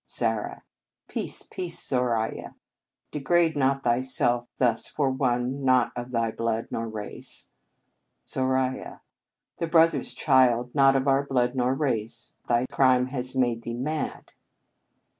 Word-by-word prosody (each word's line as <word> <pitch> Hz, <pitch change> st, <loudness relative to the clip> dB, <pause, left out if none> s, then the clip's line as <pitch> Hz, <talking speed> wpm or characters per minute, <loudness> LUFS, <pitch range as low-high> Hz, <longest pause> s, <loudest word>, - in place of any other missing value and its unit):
Zara. 115 Hz, -3 st, -2 dB, 0.4 s
Peace, -, -, -3 dB
peace, 175 Hz, -2 st, -4 dB
Zoraiya! 120 Hz, -4 st, -1 dB, 0.6 s
De 150 Hz, -, -4 dB
grade 165 Hz, +3 st, +2 dB
not 135 Hz, -1 st, +1 dB
thyself 120 Hz, 0 st, +1 dB
thus 120 Hz, -3 st, +2 dB
for 140 Hz, -3 st, 0 dB
one 130 Hz, +1 st, -1 dB
not 130 Hz, -2 st, +3 dB
of 120 Hz, 0 st, -5 dB
thy 115 Hz, -2 st, 0 dB
blood 115 Hz, 0 st, -2 dB
nor 115 Hz, 0 st, -3 dB
race. 105 Hz, -1 st, -7 dB, 0.7 s
Zoraiya. 130 Hz, 0 st, -1 dB, 0.6 s
Thy 170 Hz, -, -1 dB
brother 165 Hz, -3 st, +4 dB
s -, -, -8 dB
child 125 Hz, -1 st, +3 dB
not 135 Hz, -1 st, +5 dB
of 135 Hz, +1 st, +1 dB
our 135 Hz, 0 st, +3 dB
blood 125 Hz, -3 st, 0 dB
nor 130 Hz, 0 st, +1 dB
race! 115 Hz, -4 st, -3 dB
Thy 120 Hz, +1 st, +2 dB
crime 130 Hz, -1 st, +3 dB
has 130 Hz, -1 st, -3 dB
made 120 Hz, -3 st, +1 dB
thee 115 Hz, 0 st, -5 dB
mad. 150 Hz, +5 st, -3 dB
130 Hz, 135 wpm, -26 LUFS, 120-135 Hz, 0.7 s, not